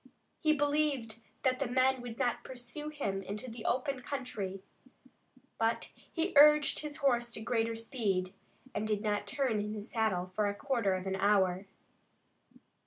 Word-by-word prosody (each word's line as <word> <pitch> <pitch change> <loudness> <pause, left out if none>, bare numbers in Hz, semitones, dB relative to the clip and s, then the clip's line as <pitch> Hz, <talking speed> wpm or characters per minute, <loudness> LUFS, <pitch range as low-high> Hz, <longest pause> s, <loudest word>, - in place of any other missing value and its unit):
He 310 - +3
believed 285 -6 +1 0.2
that 255 -1 +2
the 275 - 0
men 260 +1 +2
would 235 -2 -7
not 245 -2 0
pursue 260 +4 -5
him 200 -11 -2
into 210 +6 -6
the 225 -1 -8
open 260 +1 0
country, 205 -9 -4 1.0
but 225 0 0
he 340 +3 -3
urged 300 +1 +7
his 300 -1 -4
horse 240 -3 +2
to - - -3
greater 230 0 0
speed, 205 -6 -1 0.4
and 215 - -2
did 210 -1 0
not 205 -1 0
turn 240 -1 0
in 210 +1 -3
his 210 +2 -6
saddle 185 -5 0
for 210 +1 +1
a 200 - -2
quarter 230 -6 0
of 185 0 -4
an 190 0 -1
hour. 195 -1 +2
230 Hz, 160 wpm, -32 LUFS, 205-265 Hz, 1.0 s, urged